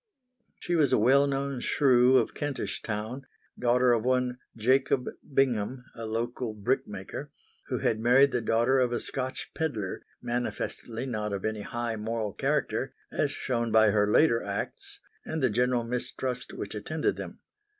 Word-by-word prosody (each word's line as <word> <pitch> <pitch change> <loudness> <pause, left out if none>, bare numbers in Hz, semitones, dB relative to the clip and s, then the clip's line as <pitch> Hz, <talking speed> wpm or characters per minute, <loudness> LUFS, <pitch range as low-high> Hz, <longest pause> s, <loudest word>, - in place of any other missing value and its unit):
She 175 - -1
was 155 -4 +3
a - - +5
well 135 +6 +5
known 140 -1 -2
shrew 130 -1 +4
of 115 - +1
Kentish 145 -4 -3
Town, 115 +5 -4 0.3
daughter 125 +1 +4
of 115 -2 +1
one 125 0 +1 0.2
Jacob 130 +2 +2 0.2
Bingham, 125 -2 +1
a 115 -1 -6
local 115 +1 -3
brickmaker, 100 -1 -3 0.4
who - - -1
had 110 - 0
married 125 +4 +5
the 125 - 0
daughter 120 +4 +3
of 125 -1 +2
a 120 - 0
Scotch 130 -1 -4
pedlar 115 -12 -3 0.2
manifestly 120 0 -3
not 105 -5 -2
of 100 - -3
any 110 -1 -2
high 120 +1 -3
moral 110 -1 -2
character 135 -1 -1 0.2
as 145 - +1
shown 120 -4 -2
by 110 -1 +6
her 105 0 +2
later 115 -5 +4
acts 100 0 -5 0.2
and 160 -3 -3
the 130 - +3
general 125 +2 +2
mistrust 125 +1 -3
which 100 - -6
attended 150 +10 -1
them. - - -7
120 Hz, 155 wpm, -28 LUFS, 110-130 Hz, 0.4 s, by